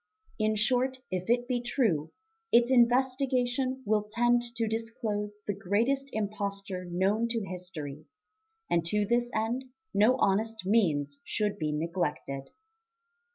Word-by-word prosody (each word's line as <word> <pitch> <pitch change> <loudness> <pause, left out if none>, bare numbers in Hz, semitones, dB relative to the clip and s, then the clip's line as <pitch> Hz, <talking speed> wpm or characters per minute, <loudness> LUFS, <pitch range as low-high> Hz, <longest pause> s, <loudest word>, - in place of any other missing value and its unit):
In 215 0 +2
short, 250 +4 +2
if 185 +2 -3
it 245 +1 +2
be 245 -2 0
true, 220 - 0 0.4
its 240 +2 +5
investigation 255 +1 +2
will 210 0 +1
tend 240 +2 +3
to 230 -1 0
disclose 215 -2 -3
the 205 - -1
greatest 230 +9 0
imposture 200 -3 -3
known 190 +6 +1
to 230 -3 -2
history; 165 -6 -7 0.6
and 170 - +2
to 210 +3 +2
this 240 +2 +1
end 240 +4 -1 0.3
no 215 +5 +5
honest 220 0 +1
means 150 -10 +2
should 210 -1 -1
be 155 -2 0
neglected. 150 -4 -2
215 Hz, 125 wpm, -29 LUFS, 185-240 Hz, 0.6 s, its